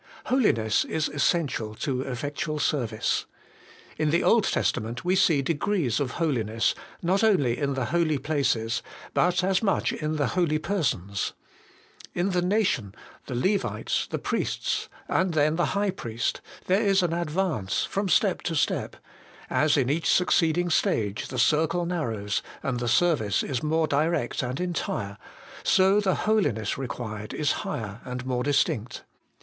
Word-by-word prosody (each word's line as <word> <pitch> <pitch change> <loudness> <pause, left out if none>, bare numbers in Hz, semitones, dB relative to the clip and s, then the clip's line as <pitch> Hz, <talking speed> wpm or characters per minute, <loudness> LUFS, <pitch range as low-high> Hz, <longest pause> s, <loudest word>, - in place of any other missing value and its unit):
Holiness 115 - +2
is 160 -1 -1
essential 140 -7 0
to 130 +2 -2
effectual 145 +4 -3
service. 120 -7 0 0.7
In 155 -1 +2
the 170 +3 +2
Old 230 -3 +4
Testament 120 +3 -1
we 180 +1 +3
see 165 -7 +3
degrees 160 - 0
of 135 -3 -2
holiness, 115 -9 0 0.3
not 190 +5 +2
only 145 - +3
in 140 0 -1
the 130 -2 -1
holy 165 -3 +2
places, 130 -6 0 0.3
but 180 +1 +2
as 190 0 +2
much 195 -5 +1
in 155 0 -2
the 145 -4 0
holy 170 -4 +1
persons. 135 - -1 0.8
In 180 +3 +1
the 180 -1 +1
nation, 180 - 0 0.3
the 130 - -4
Levites, 195 +11 0
the - - -2
priests, - - -2 0.2
and 185 -3 +1
then 155 +1 +3
the 170 -2 +1
High 200 -1 +1
Priest, 115 -10 -3 0.2
there 190 +3 +3
is 195 -3 +3
an 170 -2 0
advance 170 - -1
from 200 0 -2
step 190 +2 +3
to 165 - -2
step: 145 - 0 0.6
as 150 -1 +3
in 130 -3 +2
each 155 +5 0
succeeding 175 -1 +2
stage 105 -8 0
the 130 - -6
circle 160 +6 +2
narrows, 115 - -2 0.2
and 130 -3 -1
the 120 - -2
service 125 - +2
is 130 -4 -2
more 160 +1 +1
direct 150 -2 0
and 125 +2 -3
entire, 120 - -3 0.4
so 190 +2 +4
the 195 -3 +1
holiness 145 - +1
required 110 -5 -5
is 150 - +1
higher 105 -1 -5
and 125 0 -5
more 125 -1 -1
distinct. 125 -4 0
150 Hz, 150 wpm, -26 LUFS, 120-175 Hz, 0.8 s, Old